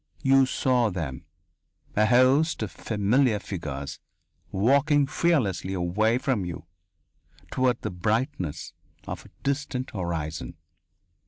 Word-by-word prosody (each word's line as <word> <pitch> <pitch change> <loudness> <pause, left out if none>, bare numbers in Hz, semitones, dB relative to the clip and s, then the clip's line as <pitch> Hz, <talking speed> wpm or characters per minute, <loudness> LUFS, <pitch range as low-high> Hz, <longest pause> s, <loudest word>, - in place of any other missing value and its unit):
You 135 0 +5
saw 125 -3 +2
them, 80 -9 -5 0.7
a 105 +1 +4
host 130 +5 +4
of 105 - -4
familiar 110 +3 +1
figures, 75 -9 -5 0.5
walking 140 +8 +3
fearlessly 130 - 0
away 100 +6 +1
from 125 -6 0
you 85 -2 -6 0.9
toward 125 -2 +1
the - - -2
brightness 95 - -2 0.3
of - - -6
a - - -27
distant 135 -2 -2
horizon. 80 - -4
110 Hz, 105 wpm, -26 LUFS, 90-130 Hz, 0.9 s, You